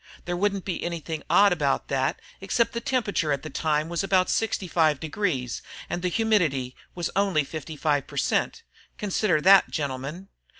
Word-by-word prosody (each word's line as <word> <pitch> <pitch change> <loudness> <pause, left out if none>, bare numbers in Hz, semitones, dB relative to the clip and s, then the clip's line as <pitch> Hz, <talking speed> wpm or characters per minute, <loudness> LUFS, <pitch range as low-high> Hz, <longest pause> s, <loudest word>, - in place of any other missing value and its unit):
There 175 - -2
wouldn't 200 +1 0
be 185 - -3
anything 165 -2 -4
odd 200 -2 +6
about 145 -5 0
that 135 -1 0 0.2
except 230 +4 +1
the 235 - -3
temperature 215 - 0
at 140 -1 -1
the 155 - -7
time 155 +1 0
was 170 +2 -2
about 190 -2 +2
65 165 -8 +1
degrees, 155 - -2 0.3
and 175 - -2
the 180 - 0
humidity 170 - +1 0.2
was 175 -2 -2
only 195 -6 +2
55 150 -1 -2
per - - -10
cent. 460 - 0 0.3
Consider 200 -4 +1
that, 195 +3 +6
gentlemen. 145 +6 -4
170 Hz, 160 wpm, -26 LUFS, 150-195 Hz, 0.3 s, odd